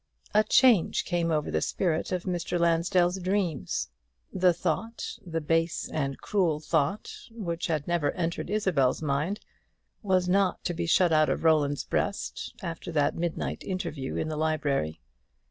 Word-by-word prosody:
A 215 +1 +5
change 235 -7 +4
came 170 -2 0
over 155 -2 0
the - - 0
spirit 165 -3 -1
of 180 -1 -1
Mr. 175 -1 -2
Lansdell's 175 +2 +2
dreams. 180 - -1 0.4
The 180 0 +4
thought, 180 +7 -3
the 165 -3 -3
base 165 +2 0
and 140 -3 -2
cruel 175 -7 +1
thought, 155 +4 0 0.2
which 175 -7 -4
had 155 -3 -1
never 170 -4 +1
entered 170 -1 -3
Isabel's 180 -11 +1
mind, 150 +8 -1 0.6
was 185 -3 +2
not 190 0 +2
to 175 - -1
be 170 0 -3
shut 175 +1 +4
out 155 -1 +4
of - - -1
Roland's 150 -3 +3
breast 200 - -3
after 170 -1 -5
that 145 -2 +2
midnight 170 -1 -3
interview 155 -8 -4
in - - -1
the 155 -1 -3
library. 145 - 0
170 Hz, 150 wpm, -28 LUFS, 155-185 Hz, 0.6 s, A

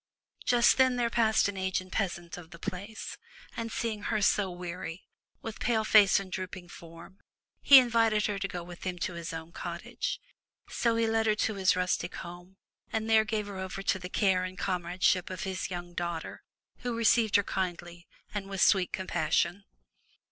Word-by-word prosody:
Just 240 -1 +5
then 260 -1 +5
there 240 -1 0
passed 220 -3 +3
an 205 -1 -4
aged 185 -1 -2
peasant 175 -4 -2
of 175 -2 -11
the 170 - -11
place, 200 +6 -6 0.4
and 230 0 -4
seeing 220 -3 -2
her 215 +1 -1
so 200 -1 +2
weary, 175 -1 -6 0.4
with 225 -1 -6
pale 225 -2 +1
face 210 -3 +6
and 195 -1 -8
drooping 185 -1 -6
form, 170 +3 -13 0.4
he 280 - +9
invited 230 -4 +4
her 205 -2 -1
to 195 - -1
go 175 -2 -6
with 175 0 -11
him 185 -1 -3
to 175 +1 -3
his 170 -1 -6
own 160 0 -7
cottage. 175 - -4 0.5
So 230 -1 0
he 230 0 +2
led 225 0 +1
her 215 - +3
to 215 +1 0
his 190 -2 +2
rustic 180 -1 -1
home 175 +2 -10 0.3
and 220 0 -2
there 220 -1 +5
gave 215 -1 -2
her 200 -2 -7
over 190 +1 -5
to 190 -1 +1
the 180 0 -7
care 190 -2 +2
and 185 0 -6
comradeship 180 0 0
of 185 - -5
his 190 -1 -3
young 175 -1 -6
daughter, 170 -2 -4 0.4
who 245 -2 -3
received 230 -2 +3
her 205 - +5
kindly 175 -2 -4 0.3
and 200 -2 -4
with 195 -1 -3
sweet 190 -3 +4
compassion. 175 +1 0
190 Hz, 185 wpm, -29 LUFS, 175-220 Hz, 0.5 s, he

